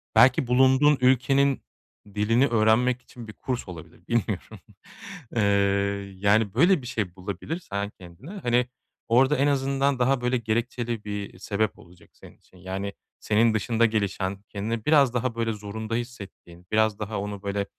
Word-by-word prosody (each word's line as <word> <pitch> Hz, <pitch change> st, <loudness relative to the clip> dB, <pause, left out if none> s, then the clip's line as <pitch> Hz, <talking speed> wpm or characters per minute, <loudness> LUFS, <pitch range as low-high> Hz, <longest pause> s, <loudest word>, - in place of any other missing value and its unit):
belki 125 Hz, +3 st, +5 dB
bulunduğun 130 Hz, +4 st, +4 dB
ülkenin 135 Hz, +2 st, +3 dB, 0.5 s
dilini 115 Hz, +6 st, +3 dB
öğrenmek 120 Hz, +2 st, +2 dB
için 120 Hz, -2 st, -12 dB
bir 105 Hz, -, -9 dB
kurs 125 Hz, 0 st, -4 dB
olabilir. 85 Hz, -4 st, -12 dB
Bilmiyorum. 110 Hz, -2 st, -2 dB, 0.8 s
Eee, 115 Hz, -, +2 dB, 0.8 s
yani, 100 Hz, +1 st, +2 dB
böyle 170 Hz, -, +4 dB
bir 125 Hz, -, -9 dB
şey 105 Hz, -8 st, -3 dB
bulabilirsen 100 Hz, -, -5 dB
kendine, 90 Hz, -, -12 dB
hani, 120 Hz, +1 st, +2 dB, 0.4 s
orada 130 Hz, +5 st, +4 dB
en 140 Hz, -, +2 dB
azından 140 Hz, -1 st, +1 dB
daha, 130 Hz, +1 st, +2 dB
böyle, 125 Hz, +1 st, +1 dB
gerekçeli 115 Hz, 0 st, -2 dB
bir 105 Hz, -3 st, -6 dB
sebep 105 Hz, +1 st, -2 dB
olacak 85 Hz, 0 st, -18 dB
senin -, -, -16 dB
için. 95 Hz, -, -23 dB
Yani, 95 Hz, +2 st, -5 dB, 0.3 s
senin 110 Hz, +1 st, +2 dB
dışında 115 Hz, +2 st, +1 dB
gelişen 100 Hz, -3 st, -1 dB
kendini 110 Hz, +2 st, -4 dB
biraz 140 Hz, -5 st, +4 dB
daha, 125 Hz, -1 st, -1 dB
böyle, 115 Hz, -1 st, -1 dB
zorunda 110 Hz, +2 st, -5 dB
hissettiğin, 100 Hz, -7 st, -8 dB
biraz 110 Hz, -1 st, +2 dB
daha 105 Hz, -1 st, -3 dB
onu, 100 Hz, 0 st, -6 dB
böyle, 100 Hz, 0 st, -2 dB
115 Hz, 145 wpm, -25 LUFS, 100-125 Hz, 0.8 s, belki